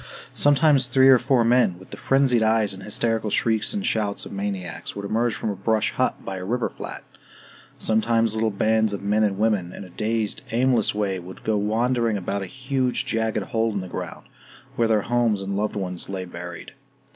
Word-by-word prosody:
Sometimes 145 -2 +4
three 130 +2 +5
or 130 -2 +7
four 130 -2 +2
men, 115 -6 +3
with 95 - -16
the - - -6
frenzied 135 -3 +2
eyes 110 -2 +2
and 95 - -8
hysterical 110 +2 0
shrieks 110 +1 +1
and 205 -1 -2
shouts 105 -2 0
of - - -9
maniacs, 100 -4 -5
would 100 0 -5
emerge 115 +3 0
from 110 - -2
a - - -5
brush 110 +3 0
hut 130 - -1
by 95 - -4
a 90 - -6
river 120 +5 -1
flat. - - -8 0.7
Sometimes 115 0 +1
little 110 0 +1
bands 110 +1 +1
of 100 - -5
men 105 +2 +1
and 100 -3 +1
women, 105 -5 +1
in - - -8
a 90 - -13
dazed 110 +1 -1
aimless 120 -2 +2
way, 100 -3 -1
would 90 +1 -11
go 110 - 0
wandering 115 +2 +1
about 100 +1 -3
a 95 - -5
huge 130 +2 -1
jagged 110 -2 -1
hole 115 +1 0
in 100 - -2
the 95 - -7
ground, - - -7 0.5
where 115 - +2
their 110 -2 +2
homes 120 -4 +1
and 95 - -4
their 100 - -1
loved 105 0 -2
ones 90 -3 -3
lay 95 -1 -4
buried. 85 0 -9
110 Hz, 205 wpm, -24 LUFS, 100-120 Hz, 0.7 s, or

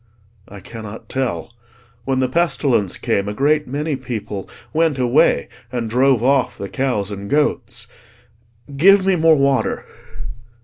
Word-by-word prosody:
"I 100 -1 -11
cannot 110 +1 -9
tell. 120 -8 -3 0.5
When 130 -1 0
the 130 - +2
pestilence 135 - +1
came, 100 +1 -1
a 105 - -5
great 150 +4 +2
many 145 +3 -2
people 110 -6 -6 0.2
went 160 -3 +2
away, 125 -1 +3 0.2
and 120 -2 -2
drove 125 +1 +2
off 135 0 +2
the 100 - -6
cows 115 -7 -1
and 100 0 -6
goats. 125 -6 0 0.9
Give 190 +6 +5
me 195 -1 +3
more 160 -1 +5
water!" 140 -1 +1
130 Hz, 135 wpm, -19 LUFS, 110-145 Hz, 0.9 s, Give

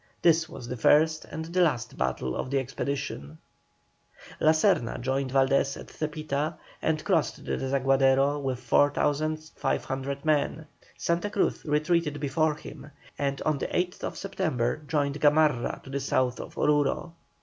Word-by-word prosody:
This 165 -1 +4
was 120 - -9
the 125 +1 -4
first 155 +6 +4
and 160 +2 -7
last 160 -10 +1
battle 65 0 -2
of - - -3
the 140 - +1
expedition. 130 - -4 1.0
La 155 - +4
Serna 155 - +2
joined 130 +1 -1
Valdés 135 +1 +2
at - - -11
Zepita, 155 0 -3 0.2
and 155 -1 0
crossed 175 -7 0
the - - -1
Desaguadero 135 +1 +2
with 130 -3 -2
4,500 145 0 0
men. 155 +1 +1 0.3
Santa 170 +4 0
Cruz 205 - 0
retreated 150 0 +1
before 150 +2 +1
him, 150 - -11 0.3
and 140 -1 -1
on 155 -2 +1
the - - -2
8th 180 0 -2
September 160 -12 -1
joined 145 -1 -1
Gamarra 145 -4 +3
to 135 - -11
the 140 - -1
south 130 -2 0
of - - -8
Oruro. 150 +3 +1
145 Hz, 140 wpm, -27 LUFS, 135-155 Hz, 1.0 s, This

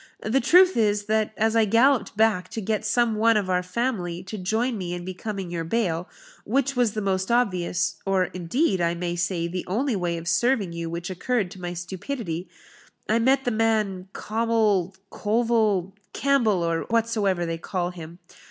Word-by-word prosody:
The 245 +5 +1
truth 365 +8 +6
is, 210 -2 +1
that 215 0 +1
as 220 +1 +1
I 225 -1 +5
galloped 230 0 +3
back 220 -4 +2
to - - +1
get 215 +1 -1
some 225 +1 +1
one 225 0 +4
of 190 -3 -1
our 180 0 +2
family 180 -3 -2
to 200 +3 -7
join 225 +7 0
me 180 -3 -4
in 175 0 -7
becoming 185 0 -5
your 170 -1 -2
bail, 175 -2 -1 0.3
which 275 +4 0
was 240 -4 +2
the 215 - -3
most 190 -1 0
obvious, 185 -7 +1
or, 195 -1 +2
indeed, 185 - 0
I 170 0 +1
may 175 0 -3
say, 175 -1 -1
the 180 +1 -4
only 235 +7 0
way 175 -3 -1
of 165 0 -7
serving 200 +1 +1
you 170 0 -4
which 170 +2 -5
occurred 195 +1 -1
to 185 - -11
my 175 0 -4
stupidity, 185 0 -5 0.6
I 220 +2 +2
met 265 +3 +2
the 245 - +1
man 215 -4 0
Cawmil 215 -5 0 0.2
Colville 215 -4 +1 0.2
Campbell, 235 -10 +2
or 165 -1 -1
whatsoever 220 -6 +1
they 165 0 -3
call 180 +1 -2
him. 170 -1 -10
200 Hz, 180 wpm, -25 LUFS, 180-230 Hz, 0.6 s, truth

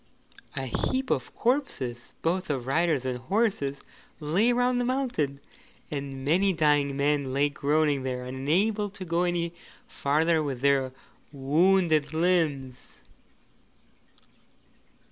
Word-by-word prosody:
A 135 - -2
heap 260 - -1
of - - -1
corpses 230 - -2
both 180 +2 0
of 135 -5 -2
riders 150 -1 +1
and 125 -1 -2
horses 155 - -1 0.4
lay 180 +11 +2
round 245 0 +2
the - - 0
mountain, 240 - -1 0.5
and 140 -2 -5
many 185 +6 +3
dying 145 -3 +2
men 140 -1 +1
lay 140 +2 +2
groaning 145 0 +1
there 125 -1 -4
unable 180 +12 0
to 190 -1 -8
go 170 0 0
any 170 -1 -1 0.3
farther 160 +3 +1
with 135 -5 -4
their 135 -2 +2 0.4
wounded 155 +2 +2
limbs. 155 -7 -1
150 Hz, 115 wpm, -27 LUFS, 140-185 Hz, 0.5 s, many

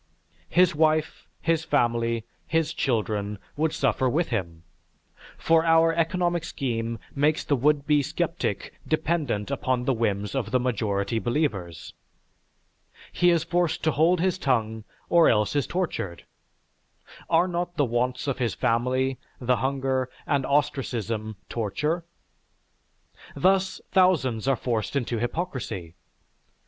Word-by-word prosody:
His 180 0 +4
wife, 155 0 +1
his 165 -1 +1
family, 115 -5 +1 0.2
his 165 -1 0
children, 105 -4 -1 0.2
would 155 +1 +1
suffer 130 -2 +1
with 165 +6 0
him, 85 -8 -3 0.7
for 165 0 +3
our 165 0 +4
economic 175 0 0
scheme 115 -7 -3 0.2
makes 150 +2 +2
the 145 - +1
would 145 +2 +2
be 150 -1 +3
sceptic 135 - -2
dependent 150 -8 -1
upon 130 -2 -1
the 135 - +2
whims 105 -3 -1
of 135 -3 -2
the 130 - +2
majority 110 -3 -1
believers. 105 - -2 1.2
He 175 - +3
is 170 -2 +3
forced 175 -1 0
to 160 - +3
hold 165 +4 +3
his 185 +1 +1
tongue, 110 -6 0 0.2
or 170 -1 +5
else 105 +4 +2
is 145 - +1
tortured. 165 - -3 1.0
Are 170 +2 +4
not 175 0 -3
the 145 - +3
wants 125 +1 -1
of 135 -2 -2
his 120 -4 0
family, 130 +3 0 0.2
the 125 0 +1
hunger, 130 -1 -1 0.2
and 140 -3 0
ostracism 115 -6 -1
torture? 150 - -2 1.3
Thus 190 +1 +2
thousands 140 - +2
are 135 - +4
forced 115 0 -2
into 120 -4 -1
hypocrisy. 120 - -4
135 Hz, 125 wpm, -26 LUFS, 115-165 Hz, 1.3 s, or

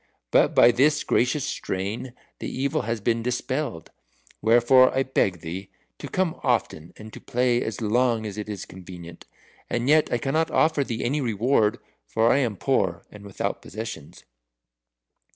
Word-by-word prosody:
But - - +3
by 120 - +7
this 145 +5 +2
gracious 130 +3 +1
strain 105 +7 -4 0.3
the - - -4
evil 135 +1 -1
has 115 -1 -1
been 115 +2 0
dispelled. 125 - -3 0.5
Wherefore 120 +3 +5
I 135 - +3
beg 95 -10 0
thee 90 +4 -6 0.3
to - - -6
come 185 -3 -1
often 95 -9 -1
and 110 0 -11
to - - -10
play 125 0 +1
as 110 -1 -4
long 115 +1 +1
as 105 -2 -5
is 105 -3 -5
convenient. 90 -2 -11 0.4
And 120 +1 -1
yet 155 +1 +4
I - - +2
cannot 155 +6 0
offer 155 -2 +2
thee 115 -4 -4
any 145 +5 0
reward, 115 -1 +1 0.3
for 110 - +2
I 140 - +3
am 115 -7 -1
poor 95 -11 0
and 105 -1 -12
without 100 -2 -4
possessions." 105 -8 -8
115 Hz, 155 wpm, -25 LUFS, 100-130 Hz, 0.5 s, by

